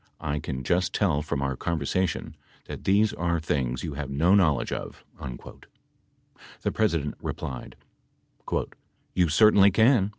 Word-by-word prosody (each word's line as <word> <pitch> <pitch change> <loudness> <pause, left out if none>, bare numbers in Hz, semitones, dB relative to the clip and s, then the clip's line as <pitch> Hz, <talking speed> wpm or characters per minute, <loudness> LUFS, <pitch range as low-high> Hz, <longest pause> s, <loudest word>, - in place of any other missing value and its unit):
I 75 -2 -2
can 65 -1 -5
just 90 +7 0
tell 80 -9 +2
from 70 -2 -2
our 65 -1 -1
conversation 85 +4 -2 0.3
that - - -8
these 105 +3 +3
are 85 0 0
things 65 -5 -2
you 80 - -4
have 70 -1 -5
no 80 +7 +3
knowledge 85 -8 +3
of." - - -6 1.6
The - - 0
President 85 -9 0
replied: 65 -2 -6 1.4
"You 90 -3 +2
certainly 100 +4 +6
can 110 0 +4
85 Hz, 130 wpm, -26 LUFS, 70-95 Hz, 1.6 s, certainly